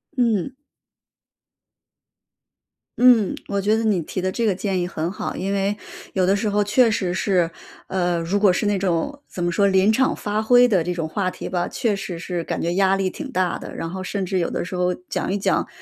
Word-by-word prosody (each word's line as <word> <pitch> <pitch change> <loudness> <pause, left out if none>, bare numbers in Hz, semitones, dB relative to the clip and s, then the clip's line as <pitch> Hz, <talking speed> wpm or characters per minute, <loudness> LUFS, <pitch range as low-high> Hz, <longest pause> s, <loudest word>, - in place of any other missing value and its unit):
嗯。 235 -2 +1 2.5
嗯， 240 -5 +5
我 200 -1 -1
觉 215 +3 +2
得 225 - -1
你 210 -5 +2
提 165 - -5
的 185 +1 -1
这 235 - -2
个 205 -4 +2
建 190 -1 -1
议 175 - -1
很 165 +1 -3
好。 - - -4
因 195 +1 -2
为 200 +1 0 0.4
有 185 -1 +2
的 195 +2 +3
时 205 +1 -1
候 205 +1 +2
确 230 +4 +4
实 185 -4 -1
是， 180 -3 +1 0.4
呃， 175 -2 0
如 180 +5 0
果 200 -2 +5
是 180 - -1
那 205 0 +2
种 195 - -1
怎 175 - -5
么 175 - +1
说 200 +4 +3
临 190 +2 +4
场 260 +3 +2
发 210 +1 -2
挥 245 +2 +6
的 190 -7 +2
这 180 - -2
种 165 -2 -2
话 185 +3 -1
题 - - -7
吧， 180 -1 -1
确 225 -5 -1
实 195 -3 -5
是 175 0 -4
感 - - -3
觉 170 +1 -1
压 195 0 +3
力 195 -1 0
挺 285 -3 -7
大 185 -6 0
的。 - - -9
然 165 - -4
后 185 +2 -5
甚 195 0 -3
至 185 +1 -1
有 170 - 0
的 - - -3
时 185 - -8
候 180 0 +1
讲 180 +1 -4
一 200 - 0
讲， 200 - 0
195 Hz, 240 characters per minute, -22 LUFS, 180-210 Hz, 2.5 s, 挥